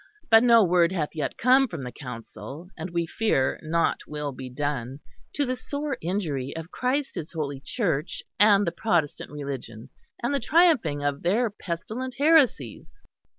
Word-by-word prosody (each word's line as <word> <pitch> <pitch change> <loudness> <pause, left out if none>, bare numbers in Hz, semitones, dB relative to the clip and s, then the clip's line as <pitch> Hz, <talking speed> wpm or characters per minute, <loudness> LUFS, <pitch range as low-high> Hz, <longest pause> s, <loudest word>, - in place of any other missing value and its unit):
But 225 0 +9
no 230 -2 +6
word 175 -1 +3
hath 160 -6 -1
yet 150 - -3
come 260 +2 +5
from 165 - -6
the 125 - -6
Council; 135 +7 -9
and 160 +3 -6
we 170 -1 -1
fear 165 -8 0
nought 165 +1 +1
will 150 -1 -4
be 130 -1 -8
done; 135 -1 -3 0.3
to 290 - 0
the 255 0 -1
sore 285 +2 -4
injury 160 -7 -2
of 165 +2 -7
Christ 265 +3 -1
His 160 +2 -6
holy 145 -4 -3
Church 170 - -2 0.2
and 205 -1 +6
the 170 - 0
Protestant 170 -5 -1
Religion; 135 -6 -7 0.3
and 240 - 0
the 280 - +1
triumphing 260 - +3
of 145 -1 -1
their 215 +6 +1
pestilent 215 +8 -5
heresies." 280 - +2
170 Hz, 160 wpm, -26 LUFS, 145-235 Hz, 0.3 s, But